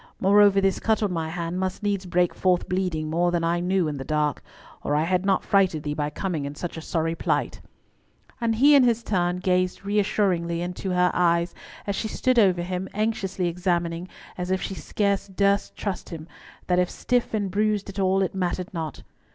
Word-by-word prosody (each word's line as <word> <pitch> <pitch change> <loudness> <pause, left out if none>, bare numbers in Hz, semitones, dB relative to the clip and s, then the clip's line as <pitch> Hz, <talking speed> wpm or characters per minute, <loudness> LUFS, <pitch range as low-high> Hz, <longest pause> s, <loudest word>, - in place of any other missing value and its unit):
Moreover, 200 0 +5
this 195 -1 +1
cut 220 -1 +1
on 205 - 0
my 160 -2 -2
hand 170 +1 -3
must 190 +2 -3
needs 200 -2 -1
break 175 0 +1
forth 180 -2 +1
bleeding 180 -4 -1
more 170 +3 +1
than 175 -1 0
I 170 +1 +1
knew 180 -1 +1
in 150 -1 -3
the 135 - -5
dark, 150 +1 0 0.4
or 145 - -1
I 150 - +2
had 180 +3 0
not 195 -1 +2
frighted 185 -6 +2
thee 150 -1 -2
by 150 0 -2
coming 160 0 -3
in 140 +1 -6
such 170 +1 -5
sorry 165 -1 -1
plight," - - -1 0.8
and 230 -1 +1
he 280 +6 +6
in 280 - +7
his 235 -1 +2
turn 180 -4 0
gazed 185 +1 0
reassuringly 195 -5 +1
into 180 +2 -4
her 180 0 +3
eyes 170 -1 +2 0.3
as 200 - -2
she 220 - -2
stood 255 +3 +1
over 185 -5 +3
him, 180 +1 -4
anxiously 195 -4 -1
examining, 175 0 -1 0.3
as 180 0 -3
if 190 0 +1
she 195 - -4
scarce 200 +1 -1
durst 200 +1 +1
trust 200 -3 -4
him, 160 -1 -8 0.4
that 180 0 +2
if 180 - +2
stiff 245 -2 -1
and 200 -3 -1
bruised 210 0 0
at 200 0 -6
all, 190 0 +2
it 185 - -2
mattered 185 +1 -2
not. 160 -4 -5
185 Hz, 200 wpm, -25 LUFS, 170-200 Hz, 0.8 s, in